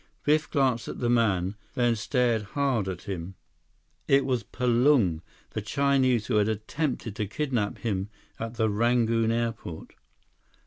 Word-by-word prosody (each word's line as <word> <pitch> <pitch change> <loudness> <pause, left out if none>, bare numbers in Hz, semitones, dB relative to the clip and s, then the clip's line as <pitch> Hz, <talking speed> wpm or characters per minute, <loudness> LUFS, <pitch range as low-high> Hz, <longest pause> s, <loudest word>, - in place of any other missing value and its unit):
Biff 155 +1 +2
glanced 130 -6 +1
at - - -5
the 120 -1 +1
man, 100 -6 +2 0.2
then 120 -2 +2
stared 120 0 +1 0.2
hard 130 -8 +1
at 90 -2 -5
him. 95 -1 -5 0.7
It 135 0 +4
was 125 -3 0
Palung, 120 - +2 0.3
the - - -3
Chinese 130 -5 +2
who - - +1
had 105 +1 +3
attempted 115 +1 -3
to 105 - -1
kidnap 120 -4 -1
him 100 -3 -2 0.3
at 115 +1 -5
the 110 -1 +2
Rangoon 115 +1 +2
airport. 115 -8 -3
115 Hz, 140 wpm, -27 LUFS, 105-125 Hz, 0.7 s, It